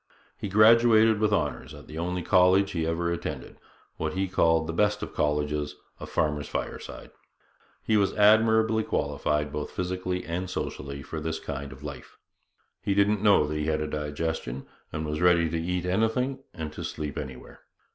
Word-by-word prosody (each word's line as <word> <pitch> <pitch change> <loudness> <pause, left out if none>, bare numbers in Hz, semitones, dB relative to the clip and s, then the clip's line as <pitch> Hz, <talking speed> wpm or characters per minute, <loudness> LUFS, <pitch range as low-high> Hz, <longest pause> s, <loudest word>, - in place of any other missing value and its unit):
He 105 - -5
graduated 110 +1 +6
with 105 -1 +2
honours 105 - -1
at - - -12
the 80 +1 -8
only 90 +1 -2
college 95 +1 +4
he 80 -2 -1
ever 85 +1 -1
attended 85 - -5 0.4
what 80 -1 -2
he 95 +1 -1
called 80 -3 +2
'the 85 - -4
best 105 +3 +1
of - - -6
colleges 75 0 -1 0.2
a - - -7
farmer's 75 -1 -1
fireside.' - - -6 0.7
He 110 - +2
was 100 -2 +2
admirably 110 +1 +4
qualified 75 -7 -1 0.2
physically 90 0 -3
and 90 +2 -3
socially 70 -5 -5
for 80 +2 -6
this 80 +1 -3
kind 70 0 -6
of 65 +1 -12
life. 70 -4 -9 0.6
He 100 - 0
didn't 100 0 +3
know 100 -7 +5
that 75 +1 -4
he 75 - -1
had 80 -1 +1
a 75 - -1
digestion, 75 -3 -3 0.3
and 80 - -3
was 75 +1 -3
ready 85 -2 +4
to 85 0 -1
eat 90 +1 -2
anything 115 +8 0
and 80 -4 -6
to - - -6
sleep 75 -2 -5
anywhere. 65 -1 -8
85 Hz, 170 wpm, -27 LUFS, 75-105 Hz, 0.7 s, graduated